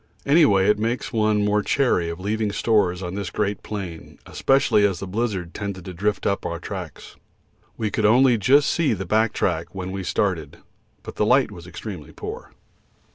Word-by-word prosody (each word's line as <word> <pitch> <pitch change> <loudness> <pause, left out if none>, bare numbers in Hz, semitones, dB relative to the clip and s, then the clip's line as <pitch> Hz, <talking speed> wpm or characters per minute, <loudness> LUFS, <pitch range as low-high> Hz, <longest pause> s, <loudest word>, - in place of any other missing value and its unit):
Any 150 +2 +5
way 95 -4 +3
it 105 0 +3
makes 115 +3 -2
one 105 -2 +2
more 105 0 +2
chary 105 -9 +1
of 85 +1 -6
leaving 105 +2 -1
stores 100 -4 +1
on 90 0 -4
this 100 -2 -4
great 100 +2 -2
plain, 95 -6 -7
especially 135 -6 +2
as 95 -4 +1
the - - -5
blizzard 95 -4 -3
tended 100 -3 -5
to 95 - -7
drift 100 +4 -1
up 100 - 0
our 85 - -3
tracks. 90 -2 -8 0.6
We 110 -2 -2
could 110 - -1
only 120 +1 +5
just 140 +7 +4
see 165 -7 +1
the 95 -2 -4
back 110 +4 +2
track - - -2
when 95 -1 -4
we 95 0 -4
started, - - -1 0.5
but - - -9
the 105 - +2
light 125 -1 +4
was 85 -3 -11
extremely 90 -3 -8
poor. - - -7
105 Hz, 185 wpm, -23 LUFS, 95-110 Hz, 0.6 s, Any